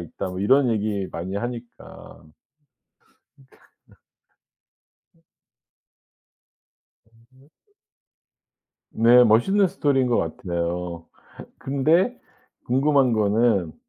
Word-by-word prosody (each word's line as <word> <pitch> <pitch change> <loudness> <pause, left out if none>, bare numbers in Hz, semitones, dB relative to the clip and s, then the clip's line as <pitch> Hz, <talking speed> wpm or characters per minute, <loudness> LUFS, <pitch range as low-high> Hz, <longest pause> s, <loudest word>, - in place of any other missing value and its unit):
있다. 85 +2 -7
뭐 90 0 -7
이런 130 +6 +3
얘기 105 -3 -2
많이 95 +4 -5
하니까. 120 +2 -9 1.1
니칸 135 -1 -24 0.3
너. - - -24 1.2
어. 165 - -34 1.8
어디였지? 130 - -28 1.2
네 120 +2 +5
멋있는 155 - +3
스토리인 140 -8 0
것 120 - 0
같아요. 85 0 -4 0.5
근데 160 - 0 0.5
궁금한 135 0 +2
거는 105 -5 +1
120 Hz, 170 characters per minute, -22 LUFS, 100-135 Hz, 1.8 s, 네